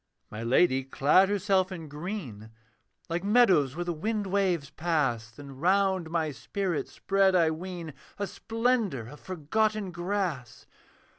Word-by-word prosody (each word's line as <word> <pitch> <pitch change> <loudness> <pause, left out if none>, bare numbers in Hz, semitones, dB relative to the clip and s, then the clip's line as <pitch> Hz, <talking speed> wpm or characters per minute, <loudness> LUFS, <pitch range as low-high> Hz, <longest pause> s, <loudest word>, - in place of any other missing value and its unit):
My 105 - -6
Lady 130 +3 +3
clad 145 +8 +3
herself 195 -2 +1
in 165 -4 -7
green, 150 - -6 0.6
Like 170 +1 -2
meadows 195 - +4
where 175 +1 -3
the 175 - -1
wind 210 +6 -2
waves 185 -7 0
pass; 145 -9 0
Then 140 +5 -11
round 190 0 +2
my 160 -2 0
spirit 180 +3 -3
spread, 195 -1 +2
I 165 -3 +4
ween, 170 -1 -6 0.2
A 200 - -1
splendour 225 - -1
of 150 - -12
forgotten 200 +4 -1
grass. 175 - -3
175 Hz, 135 wpm, -28 LUFS, 150-195 Hz, 0.6 s, meadows